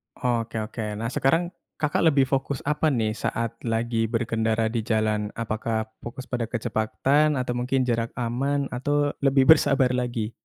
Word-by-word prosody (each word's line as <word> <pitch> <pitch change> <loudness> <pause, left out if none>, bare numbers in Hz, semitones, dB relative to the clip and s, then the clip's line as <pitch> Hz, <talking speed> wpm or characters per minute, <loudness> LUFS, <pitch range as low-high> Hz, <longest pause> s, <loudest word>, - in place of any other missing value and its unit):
Oke 120 -3 -1
oke. 105 -1 -5
Nah 115 +3 -3
sekarang 165 +7 +1 0.2
Kakak 150 +2 +1
lebih 140 -3 +4
fokus 135 0 -2
apa 150 +2 +1
nih 115 -6 +1
saat 115 +1 -3
lagi 115 0 0
berkendara 110 -1 0
di 120 - -1
jalan? 110 -1 0
Apakah 110 0 -2 0.2
fokus 125 +2 -7
pada 120 -3 -3
kecepatan 135 +6 +1
atau 125 -1 -1
mungkin 125 +2 0
jarak 115 -1 -1
aman? 135 +4 -1
Atau 145 +3 0
lebih 135 -1 +4
bersabar 140 -3 +5
lagi? 120 -3 -2
120 Hz, 150 wpm, -25 LUFS, 115-135 Hz, 0.2 s, bersabar